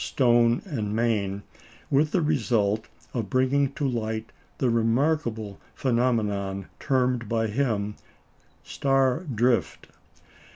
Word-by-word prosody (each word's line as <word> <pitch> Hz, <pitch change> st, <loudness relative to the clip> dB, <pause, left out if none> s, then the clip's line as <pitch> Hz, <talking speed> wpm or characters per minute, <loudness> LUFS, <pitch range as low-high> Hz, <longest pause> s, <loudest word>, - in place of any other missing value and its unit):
Stone 120 Hz, -2 st, +3 dB
and 110 Hz, -, -3 dB
Main, 100 Hz, -4 st, 0 dB, 0.5 s
with 150 Hz, +3 st, +3 dB
the 175 Hz, +1 st, +1 dB
result 110 Hz, -7 st, +1 dB, 0.3 s
of 115 Hz, -6 st, -3 dB
bringing 130 Hz, +3 st, +2 dB
to 145 Hz, -, -1 dB
light 110 Hz, -3 st, -3 dB, 0.3 s
the 125 Hz, -3 st, +1 dB
remarkable 115 Hz, -2 st, 0 dB, 0.2 s
phenomenon 105 Hz, -6 st, 0 dB
termed 125 Hz, -4 st, 0 dB
by 115 Hz, -1 st, +1 dB
him 105 Hz, -3 st, -1 dB, 0.7 s
"star 135 Hz, -1 st, +1 dB
drift." 120 Hz, -3 st, 0 dB
120 Hz, 100 wpm, -26 LUFS, 110-135 Hz, 0.7 s, Stone